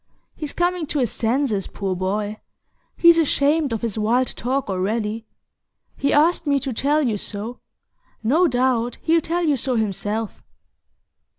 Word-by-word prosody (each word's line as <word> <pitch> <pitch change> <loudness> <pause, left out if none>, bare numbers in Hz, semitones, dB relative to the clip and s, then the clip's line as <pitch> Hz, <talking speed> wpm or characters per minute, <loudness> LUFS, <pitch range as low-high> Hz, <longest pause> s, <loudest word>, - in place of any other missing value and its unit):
He's 300 -3 -4
coming 350 -2 0
to 295 - -2
his 250 -5 +1
senses, 230 -4 0
poor 195 -2 -3
boy; 205 +3 -2 0.6
he's 340 -1 +6
ashamed 295 -1 +2
of 225 -1 -3
his 225 -2 -2
wild 235 +4 +2
talk 260 +3 -1
already. 210 +3 -2 0.7
He 280 - 0
asked 325 +2 +3
me 280 -1 +3
to 270 -1 -3
tell 290 +6 +1
you 225 -6 0
so; 215 +4 -5 0.6
no 315 +11 +3
doubt 245 -2 0
he'll 330 0 +3
tell 345 +3 -1
you 300 -3 +3
so 255 0 -1
himself." 210 0 -2
250 Hz, 150 wpm, -22 LUFS, 215-295 Hz, 0.7 s, he's